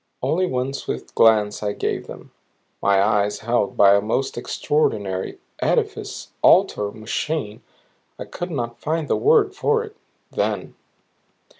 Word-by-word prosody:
Only 185 Hz, +3 st, +1 dB
one 130 Hz, -2 st, -2 dB
swift 65 Hz, -, -5 dB
glance 105 Hz, -2 st, +4 dB
I 105 Hz, -1 st, -1 dB
gave -, -, -3 dB
them, -, -, -11 dB, 0.5 s
my 100 Hz, -1 st, +3 dB
eyes 105 Hz, 0 st, +1 dB
held 115 Hz, -3 st, 0 dB
by 100 Hz, 0 st, +7 dB
a 100 Hz, -, +4 dB
most 125 Hz, +6 st, -1 dB
extraordinary 100 Hz, -11 st, -1 dB, 0.2 s
edifice -, -, -1 dB
altar 105 Hz, -1 st, +4 dB
machine 110 Hz, +3 st, -4 dB, 0.6 s
I -, -, -6 dB
could 175 Hz, -, -6 dB
not 120 Hz, -7 st, -4 dB
find 160 Hz, 0 st, -1 dB
the -, -, +1 dB
word 425 Hz, -2 st, +3 dB
for 450 Hz, +3 st, +1 dB
it 430 Hz, -2 st, -11 dB, 0.4 s
then. -, -, -2 dB
115 Hz, 135 wpm, -22 LUFS, 105-155 Hz, 0.6 s, by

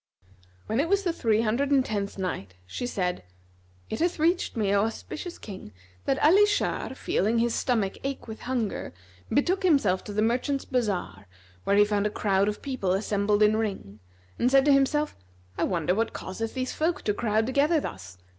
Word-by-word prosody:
When 220 Hz, +3 st, -1 dB
it 320 Hz, +4 st, +1 dB
was 400 Hz, 0 st, +2 dB
the 345 Hz, -3 st, 0 dB
Three 225 Hz, -8 st, +1 dB
Hundred 235 Hz, +6 st, 0 dB
and 275 Hz, -2 st, +3 dB
Tenth 200 Hz, -2 st, -3 dB
Night, 100 Hz, -, -4 dB
She 245 Hz, -, -4 dB
said, 180 Hz, -, -2 dB, 0.7 s
It 220 Hz, -, -4 dB
hath 345 Hz, +1 st, +1 dB
reached 335 Hz, -4 st, +1 dB
me, 200 Hz, -3 st, +1 dB
O 200 Hz, +1 st, +3 dB
auspicious 305 Hz, +9 st, -6 dB
King, 190 Hz, -, -10 dB, 0.3 s
that 270 Hz, -, +1 dB
Ali 395 Hz, +7 st, +6 dB
Shar 410 Hz, -9 st, -1 dB
feeling 220 Hz, -2 st, 0 dB
his 235 Hz, 0 st, +2 dB
stomach 220 Hz, -7 st, 0 dB
ache 275 Hz, -2 st, -4 dB
with 220 Hz, 0 st, -7 dB
hunger, 240 Hz, -, -3 dB, 0.4 s
betook 365 Hz, +7 st, +1 dB
himself 275 Hz, -, +3 dB
to -, -, -6 dB
the 210 Hz, +1 st, +1 dB
merchants' 255 Hz, +4 st, 0 dB
bazar 185 Hz, -, -2 dB, 0.4 s
where 200 Hz, -, +3 dB
he 205 Hz, 0 st, +6 dB
found 205 Hz, 0 st, +1 dB
a -, -, -2 dB
crowd 200 Hz, -1 st, +1 dB
of 210 Hz, 0 st, -3 dB
people 255 Hz, -10 st, -1 dB
assembled 205 Hz, +1 st, +1 dB
in 210 Hz, +1 st, +4 dB
ring, 195 Hz, -, -4 dB, 0.4 s
and 245 Hz, -, +3 dB
said 270 Hz, +1 st, +5 dB
to 290 Hz, -, +6 dB
himself, 295 Hz, +2 st, +2 dB, 0.4 s
"I -, -, 0 dB
wonder 175 Hz, -2 st, 0 dB
what 225 Hz, +3 st, -1 dB
causeth 225 Hz, +6 st, -5 dB
these 255 Hz, 0 st, -2 dB
folk 325 Hz, +2 st, -1 dB
to 210 Hz, -, +1 dB
crowd 220 Hz, 0 st, +1 dB
together 285 Hz, +6 st, +2 dB
thus? 95 Hz, -, -7 dB
225 Hz, 185 wpm, -27 LUFS, 200-275 Hz, 0.7 s, Ali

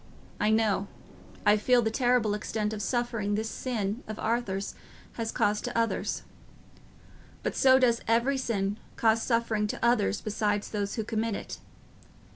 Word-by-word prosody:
I 210 Hz, -, +2 dB
know, 215 Hz, -3 st, +2 dB, 0.6 s
I 210 Hz, +1 st, +6 dB
feel 240 Hz, +3 st, +3 dB
the 220 Hz, -, 0 dB
terrible 245 Hz, -3 st, +2 dB
extent 210 Hz, 0 st, -2 dB
of 210 Hz, -, -4 dB
suffering 230 Hz, -2 st, -1 dB
this 220 Hz, +1 st, -2 dB
sin 225 Hz, -3 st, -2 dB
of 215 Hz, 0 st, -5 dB
Arthur's 210 Hz, -4 st, -1 dB, 0.4 s
has 225 Hz, -1 st, -3 dB
caused 210 Hz, 0 st, +1 dB
to -, -, -3 dB
others; 230 Hz, 0 st, 0 dB, 1.2 s
but -, -, -2 dB
so 260 Hz, -1 st, +6 dB
does 240 Hz, -3 st, +3 dB
every 235 Hz, +4 st, +2 dB
sin 205 Hz, -5 st, -1 dB, 0.2 s
cause 225 Hz, 0 st, +3 dB
suffering 230 Hz, -3 st, +1 dB
to 220 Hz, -, -2 dB
others 220 Hz, -4 st, +2 dB
besides 210 Hz, -1 st, -1 dB
those 205 Hz, -1 st, -2 dB
who 220 Hz, -, -1 dB
commit 220 Hz, 0 st, -1 dB
it. -, -, -7 dB
220 Hz, 150 wpm, -28 LUFS, 210-235 Hz, 1.2 s, I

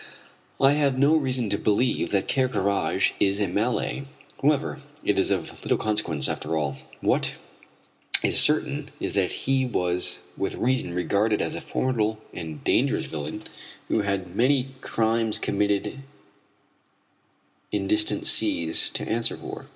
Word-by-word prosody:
I 135 Hz, 0 st, +5 dB
have 145 Hz, -3 st, +1 dB
now 140 Hz, +3 st, +4 dB
reason 130 Hz, -6 st, +1 dB
to 100 Hz, -, 0 dB
believe 110 Hz, +4 st, +1 dB
that 100 Hz, -2 st, 0 dB
Ker 130 Hz, -2 st, +1 dB
Karraje 100 Hz, -5 st, +1 dB
is 100 Hz, 0 st, +2 dB
a 105 Hz, -, +2 dB
Malay. 115 Hz, +8 st, -1 dB, 0.4 s
However, 150 Hz, +1 st, 0 dB, 0.2 s
it 105 Hz, -, +2 dB
is 95 Hz, -, +1 dB
of 95 Hz, -5 st, -3 dB
little -, -, 0 dB
consequence, 105 Hz, -10 st, 0 dB
after 80 Hz, +1 st, -3 dB
all. 70 Hz, -3 st, -2 dB, 0.2 s
What -, -, +1 dB, 0.9 s
is -, -, +3 dB
certain 150 Hz, -1 st, +2 dB
is -, -, -2 dB
that 95 Hz, -3 st, +1 dB
he 135 Hz, 0 st, +2 dB
was 90 Hz, -7 st, 0 dB, 0.2 s
with 100 Hz, -, -3 dB
reason 125 Hz, -8 st, -1 dB
regarded 100 Hz, +5 st, +1 dB
as -, -, -2 dB
a -, -, -5 dB
formidable 110 Hz, -4 st, -1 dB, 0.2 s
and 80 Hz, -4 st, -7 dB
dangerous -, -, +1 dB
villain 80 Hz, +7 st, -6 dB, 0.5 s
who -, -, +1 dB
had 95 Hz, -3 st, -3 dB
many 130 Hz, +3 st, +2 dB
crimes, 115 Hz, -1 st, +2 dB
committed 100 Hz, +5 st, -1 dB, 1.7 s
in 100 Hz, -2 st, -1 dB
distant 105 Hz, +2 st, +2 dB
seas, 80 Hz, -1 st, +5 dB
to -, -, -3 dB
answer 115 Hz, +1 st, +2 dB
for. -, -, -9 dB
105 Hz, 145 wpm, -25 LUFS, 95-130 Hz, 1.7 s, I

